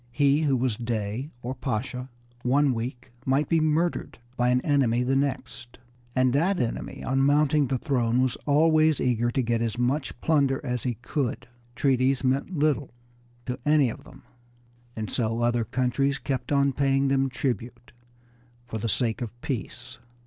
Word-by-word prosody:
He 140 +3 +3
who 140 -4 +2
was 120 -3 0
Dey 115 +3 -3
or 125 +2 -3
Pasha 125 +1 -4 0.3
one 135 +2 +3
week 125 +2 -5
might 135 +3 +1
be 165 - +3
murdered 160 +2 0 0.2
by 125 0 +2
an 125 0 +3
enemy 125 -5 +2
the 130 +2 +1
next, 130 -3 -3 0.4
and 130 -1 +3
that 175 +7 +2
enemy 120 -3 -3
on 135 0 +1
mounting 145 +1 +3
the 130 - 0
throne 125 -4 0
was 130 -2 +1
always 155 +1 +4
eager 120 -1 +1
to 130 +2 0
get 115 0 0
as 115 0 -2
much 130 +1 -1
plunder 140 -3 +2
as 125 -2 -2
he 125 -2 -2
could. 135 -7 -2 0.3
Treaties 135 0 +2
meant 135 +7 0
little 145 -2 +1 0.6
to 125 -1 -4
any 150 -3 +4
of - - -11
them, - - -15 0.7
and 110 -1 -4
so 115 -1 0
other 120 0 +2
countries 130 +4 0
kept 130 -2 -3
on 140 -1 +3
paying 135 0 +2
them 135 0 +2
tribute 125 -1 -4 0.7
for 110 -2 -5
the 115 - -2
sake 115 +2 0
of 120 0 -6
peace. 125 -8 -5
130 Hz, 165 wpm, -26 LUFS, 120-140 Hz, 0.7 s, always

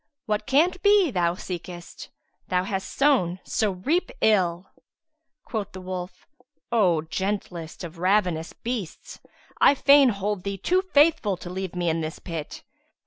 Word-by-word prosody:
What 210 0 -2
can't 325 +7 +2
be 405 -6 +4
thou 175 -4 +1
seekest; 175 -1 -8 0.2
* - - -46
Thou 180 0 +1
hast 190 0 -4
sown 245 -11 +2
so 210 -3 0
reap 305 - 0
Ill!" 180 -4 +2 0.8
Quoth 210 -4 -4
the 185 - -7
wolf, 185 0 -7 0.5
"O 180 -9 +3
gentlest 180 -2 -4
of 170 0 -8
ravenous 180 -3 +1
beasts, 230 -8 -6 0.4
I 285 - +6
fain 280 -1 +6
hold 200 -2 -2
thee 200 0 -3
too 365 - +1
faithful 300 - +3
to 175 - -8
leave 190 -1 -5
me 175 -1 -1
in 165 0 0
this 155 0 -5
pit." 165 -4 -7
190 Hz, 145 wpm, -25 LUFS, 175-245 Hz, 0.8 s, I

